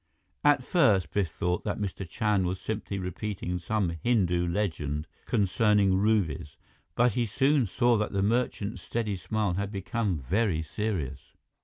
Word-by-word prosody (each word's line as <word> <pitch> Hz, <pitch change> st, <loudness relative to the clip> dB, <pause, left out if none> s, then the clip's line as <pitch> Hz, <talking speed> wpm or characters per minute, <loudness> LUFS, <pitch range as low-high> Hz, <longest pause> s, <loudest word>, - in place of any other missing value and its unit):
At 145 Hz, -3 st, +4 dB
first, 100 Hz, -, +3 dB
Biff 100 Hz, -5 st, 0 dB
thought 90 Hz, -2 st, -1 dB
that -, -, -2 dB
Mr. 95 Hz, -3 st, -4 dB
Chand 105 Hz, -2 st, +1 dB
was 90 Hz, +1 st, -2 dB
simply 110 Hz, -2 st, -4 dB
repeating 90 Hz, -1 st, -3 dB
some 90 Hz, -3 st, -1 dB
Hindu 90 Hz, -7 st, +2 dB
legend 80 Hz, -6 st, -2 dB, 0.2 s
concerning 105 Hz, 0 st, +3 dB
rubies, 95 Hz, -8 st, 0 dB, 0.4 s
but 120 Hz, +1 st, +4 dB
he 120 Hz, +2 st, 0 dB
soon 135 Hz, +3 st, +2 dB
saw 120 Hz, +5 st, +3 dB
that 105 Hz, -, -1 dB
the 100 Hz, -1 st, 0 dB
merchant's 110 Hz, -1 st, 0 dB
steady 110 Hz, -4 st, -2 dB
smile 100 Hz, +1 st, -1 dB
had 100 Hz, +2 st, -2 dB
become 100 Hz, -1 st, -1 dB
very 85 Hz, -, 0 dB
serious. 80 Hz, -, -4 dB
100 Hz, 145 wpm, -28 LUFS, 90-110 Hz, 0.4 s, At